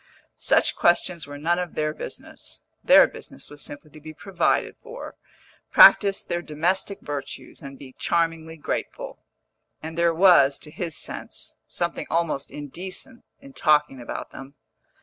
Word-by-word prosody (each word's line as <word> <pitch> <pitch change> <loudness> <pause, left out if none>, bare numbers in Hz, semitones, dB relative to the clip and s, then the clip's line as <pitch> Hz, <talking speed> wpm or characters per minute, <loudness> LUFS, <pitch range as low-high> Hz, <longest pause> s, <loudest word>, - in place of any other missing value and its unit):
Such - - +3
questions 175 -2 +2
were 145 0 -8
none 170 +4 +1
of 180 -2 -4
their 155 0 0
business - - -7 0.2
(their - - +8
business - - -9
was 145 -1 -10
simply 145 +2 -9
to 155 - -13
be 155 +1 -10
provided 185 0 0
for, 470 +1 -9 0.6
practise 205 - +7
the 175 0 -3
domestic 175 +5 -1
virtues, 145 -2 -7
and 135 -1 -9
be 130 -2 -12
charmingly 165 -1 -1
grateful), 150 - -4 0.6
and 160 +1 -7
there 170 0 +3
was, 160 -7 +6
to 150 - -11
his 165 0 -4
sense, - - -5
something - - -3
almost 160 -4 -1
indecent 185 - -8 0.2
in 275 0 -14
talking 150 - +2
about 120 - -6
them. 135 +2 -11
160 Hz, 145 wpm, -24 LUFS, 145-175 Hz, 0.6 s, their